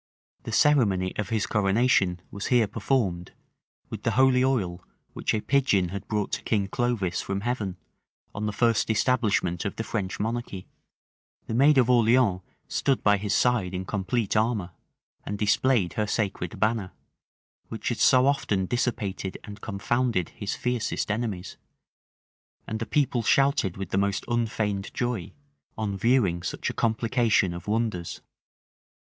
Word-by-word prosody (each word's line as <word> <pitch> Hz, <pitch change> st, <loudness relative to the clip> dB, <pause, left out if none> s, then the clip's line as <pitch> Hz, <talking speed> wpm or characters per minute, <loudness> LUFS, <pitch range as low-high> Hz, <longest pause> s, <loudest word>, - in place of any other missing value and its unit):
The -, -, -4 dB
ceremony 100 Hz, -11 st, +3 dB
of 105 Hz, -2 st, -2 dB
his 110 Hz, -2 st, 0 dB
coronation 100 Hz, -3 st, +2 dB
was 100 Hz, 0 st, -5 dB
here 120 Hz, -3 st, +4 dB
performed[*] 95 Hz, -7 st, -1 dB, 0.6 s
with -, -, -5 dB
the -, -, 0 dB
holy 130 Hz, -1 st, +5 dB
oil, 95 Hz, -10 st, 0 dB, 0.3 s
which -, -, -1 dB
a 105 Hz, -, -1 dB
pigeon 115 Hz, -11 st, +2 dB
had 100 Hz, +1 st, -6 dB
brought 105 Hz, -2 st, -1 dB
to -, -, -2 dB
King 100 Hz, -3 st, 0 dB
Clovis 110 Hz, -7 st, -1 dB
from 100 Hz, 0 st, -3 dB
heaven, 105 Hz, -5 st, -2 dB, 0.6 s
on 105 Hz, +1 st, -3 dB
the -, -, -1 dB
first 115 Hz, +1 st, +1 dB
establishment 105 Hz, -6 st, +1 dB
of 100 Hz, -, -3 dB
the 115 Hz, -, -3 dB
French 100 Hz, -4 st, -3 dB
monarchy: 110 Hz, -3 st, -3 dB, 0.8 s
the -, -, -5 dB
maid 140 Hz, +5 st, +5 dB
of 125 Hz, -3 st, +5 dB
Orleans 120 Hz, -5 st, +3 dB, 0.3 s
stood 135 Hz, -2 st, 0 dB
by 105 Hz, -1 st, +4 dB
his 100 Hz, 0 st, -1 dB
side 105 Hz, -7 st, +1 dB
in 95 Hz, +1 st, -4 dB
complete 100 Hz, +3 st, -1 dB
armor, 110 Hz, -5 st, 0 dB, 0.5 s
and 105 Hz, -, -4 dB
displayed 105 Hz, -1 st, +2 dB
her 105 Hz, -1 st, -1 dB
sacred 100 Hz, -5 st, -2 dB
banner, 110 Hz, -3 st, 0 dB, 0.7 s
which -, -, -4 dB
had -, -, -3 dB
so 130 Hz, 0 st, +5 dB
often 105 Hz, -9 st, +1 dB
dissipated 105 Hz, -4 st, -2 dB
and 105 Hz, 0 st, -10 dB
confounded 110 Hz, -1 st, -1 dB
his 105 Hz, -, -5 dB
fiercest 125 Hz, -3 st, -2 dB
enemies: 105 Hz, -5 st, -3 dB, 1.1 s
and 110 Hz, -, -4 dB
the 115 Hz, -, -4 dB
people 135 Hz, -4 st, +1 dB
shouted 135 Hz, -6 st, +2 dB
with 95 Hz, -2 st, -6 dB
the 95 Hz, -, +2 dB
most 100 Hz, 0 st, 0 dB
unfeigned 110 Hz, -4 st, -1 dB
joy, 120 Hz, -7 st, -2 dB, 0.5 s
on 105 Hz, -3 st, -2 dB
viewing 100 Hz, -5 st, +2 dB
such 90 Hz, -, -3 dB
a -, -, -10 dB
complication 115 Hz, -4 st, +1 dB
of 85 Hz, +2 st, -8 dB
wonders. 105 Hz, -5 st, -2 dB
105 Hz, 150 wpm, -26 LUFS, 95-120 Hz, 1.1 s, holy